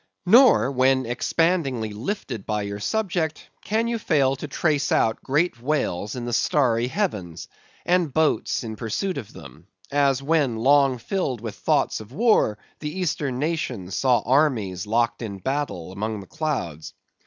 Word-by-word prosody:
Nor 235 - +6
when 130 0 +3
expandingly 130 - 0
lifted 120 - -5
by 105 -1 -1
your 100 0 -5
subject, 175 - -2 0.2
can 220 +3 0
you 235 -1 -1
fail 140 -8 +2
to 150 - -6
trace 150 0 0
out 110 - +2
great 145 -2 0
whales 125 -8 -1
in 120 -1 -5
the 120 - -3
starry 120 -1 +2
heavens, 100 - -3 0.4
and 175 -4 +2
boats 155 -2 +1
in 110 -1 -5
pursuit 140 - -2
of 110 - -9
them; 75 +3 -13 0.2
as 140 -2 +2
when 145 -5 +1
long 135 +2 +4
filled 135 - -2
with 110 -1 -6
thoughts - - 0
of 110 +1 -11
war 210 - +3 0.2
the 150 +3 -5
Eastern 145 -7 -1
nations 130 - -3
saw 125 -3 +3
armies 115 - +1
locked 115 +3 +1
in 105 -4 -5
battle 130 - -3
among 105 +2 -3
the 100 - -10
clouds. 85 - -4
130 Hz, 155 wpm, -24 LUFS, 110-155 Hz, 0.4 s, Nor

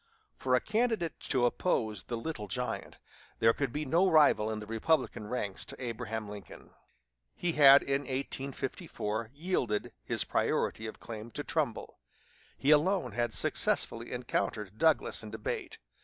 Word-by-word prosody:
For 130 -1 +1
a - - +4
candidate 215 - 0
to 130 -3 +3
oppose 110 - 0
the 120 - -3
"Little 115 -4 -5
Giant," 125 +5 -4 0.4
there 115 0 +5
could 135 -1 -2
be 150 +4 -3
no 170 +7 +3
rival 150 -9 +5
in 110 -1 -3
the 105 - -7
Republican 115 0 0
ranks 105 -5 -2
to - - -8
Abraham 115 -3 -4
Lincoln. 105 -1 -10 0.6
He 175 - 0
had 140 -3 +8
in 135 0 +1
1854 130 -5 -3
yielded 140 - -1
his - - 0
priority 110 - 0
of 110 - -8
claim 110 0 -7
to - - -4
Trumbull; - - -2 0.6
he 140 - +2
alone 155 - +3
had 120 +2 -1
successfully - - +1
encountered 105 -1 -2
Douglas 160 -7 +3
in 110 - -7
debate. 110 0 -4
125 Hz, 145 wpm, -31 LUFS, 110-150 Hz, 0.6 s, had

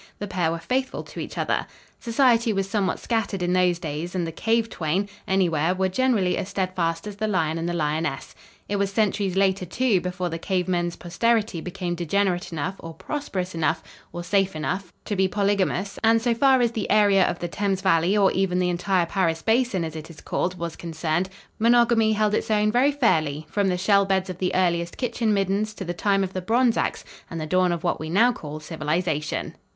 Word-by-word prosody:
The 205 - -4
pair 180 -4 0
were 165 - -2
faithful 260 +9 -2
to - - -10
each - - -6
other. - - 0 0.3
Society 235 -1 +3
was 195 -2 -1
somewhat 195 -2 0
scattered 205 -5 -2
in 175 0 +1
those 180 -1 +3
days, 165 +2 -5
and 175 -2 0
the 165 - -4
cave 225 +6 +1
twain, 180 0 -1 0.2
anywhere, 180 -3 +2
were 190 0 +1
generally 210 -4 +1
as 190 - -4
steadfast 180 -3 -1
as 205 -1 -7
the 215 +1 -1
lion 165 -5 0
and 170 +1 -2
the - - -2
lioness. 155 -3 -2 0.3
It 205 - -1
was 200 0 0
centuries 200 -2 0
later, 195 -1 +2
too, 205 +1 +1
before 180 0 -3
the 165 0 -4
cave 185 0 -1
men's 175 -1 0
posterity 210 0 0
became 180 0 -4
degenerate 180 +1 0
enough 165 +5 -3
or 165 -1 -9
prosperous 185 - -4
enough, 165 0 0 0.3
or 175 0 -6
safe 195 0 +1
enough, 180 +4 -3
to 205 - -2
be 190 0 +3
polygamous, 200 -1 0
and, 225 +1 +5
so 235 +1 +1
far 260 +2 +4
as 235 -2 +2
the 220 -3 -3
area 200 -2 +5
of 175 - 0
the 175 - -4
Thames 195 +1 -1
valley 170 +5 +3
or 195 -2 +4
even 190 -1 0
the 180 0 +1
entire 180 0 +1
"Paris 165 -3 0
basin," 225 -5 +2
as 160 -1 -5
it 160 +1 -7
is 165 - -12
called, 180 +1 -2
was 170 -1 -4
concerned, 165 +2 -2 0.3
monogamy 230 -1 +4
held 210 0 +1
its - - -1
own 210 0 +2
very 255 +5 +3
fairly, 155 - +1
from 200 -1 +1
the 180 -1 +1
shell 200 +2 +3
beds 190 -1 0
of 180 - -10
the 180 -1 -1
earliest 170 -2 0
kitchen 235 -3 0
middens 200 +2 0
to 190 - -6
the 175 - -3
time 195 +2 +1
of 190 0 -4
the 185 - -3
bronze 235 +4 +2
ax - - -2 0.2
and 165 - -5
the 155 - -3
dawn 185 +2 +2
of 170 0 -3
what 175 - 0
we 155 - -5
now 225 +8 +4
call 155 -8 -7
civilization. 155 0 -2
185 Hz, 210 wpm, -24 LUFS, 170-210 Hz, 0.3 s, and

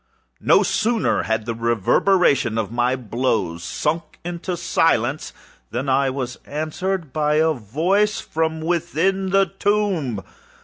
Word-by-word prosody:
No - - +4
sooner 225 0 +1
had 110 -1 -1
the 115 - -2
reverberation 120 - +2
of 110 -2 -2
my 120 +2 +1
blows 110 -8 -1
sunk 155 - -2
into 175 +1 -4
silence, 155 -5 +1 0.4
than 125 +5 -3
I 135 +1 +3
was 130 -2 -4
answered 155 +2 -3
by 150 -1 +1
a 160 +1 +3
voice 170 - 0
from 160 0 -2
within 175 +3 0
the 195 +1 +4
tomb! 190 - -1
155 Hz, 125 wpm, -21 LUFS, 120-180 Hz, 0.4 s, No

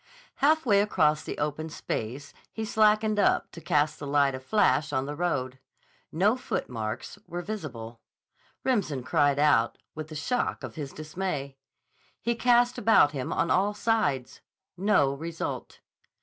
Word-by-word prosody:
Halfway 280 -9 +4
across 155 -7 +2
the - - -6
open 150 +2 -2
space 135 0 -5 0.2
he 220 - -4
slackened 215 0 +3
up - - +2
to 165 - -10
cast 150 -1 +1
the 145 - -6
light 140 -1 +3
of 130 - -6
the 130 - -27
flash 185 -7 +2
on 130 -2 0
the 145 - -4
road. 130 -6 -2 0.5
No 200 +8 +3
footmarks 115 - -4
were 175 +1 -5
visible. 120 - -7 0.6
Remsen 185 - 0
cried 145 +2 +2
out, 145 -6 +3 0.2
with 155 -1 -6
the 155 - -9
shock 245 +11 -1
of - - -6
his 145 -4 -6
dismay. 155 -3 -4 0.6
He 235 - 0
cast 245 +1 +3
about 205 -9 +5
him 135 -4 -4
on 170 - 0
all 205 +3 +2
sides. 205 - 0 0.3
No 180 -8 +2
result. 165 +3 -5
155 Hz, 150 wpm, -27 LUFS, 140-210 Hz, 0.6 s, about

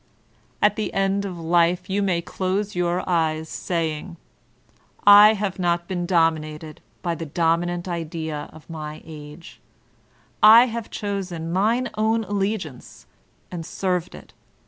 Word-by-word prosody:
At 210 +1 +4
the 215 - -2
end 195 +1 +1
of 185 -3 -5
life 170 +2 +1
you 195 +1 0
may 180 -4 0
close 195 +4 -2
your 175 0 -1
eyes, 160 -3 0
saying: 165 0 -3 0.9
"I 205 +1 +9
have 195 -2 -3
not 170 -1 0
been 175 -2 -3
dominated 155 -3 0 0.2
by 175 -2 0
the 165 -1 -6
Dominant 175 +3 0
Idea 160 -3 -4
of 155 - -15
my 155 -2 -7
Age; 150 +1 -11 0.8
I 225 +3 +9
have 230 -2 -5
chosen 185 -5 -4
mine 230 +7 +1
own 220 +1 +2
alliance, 195 - -4 0.5
and 175 -2 -5
served 180 +1 -2
it. - - -14
175 Hz, 130 wpm, -23 LUFS, 165-200 Hz, 0.9 s, I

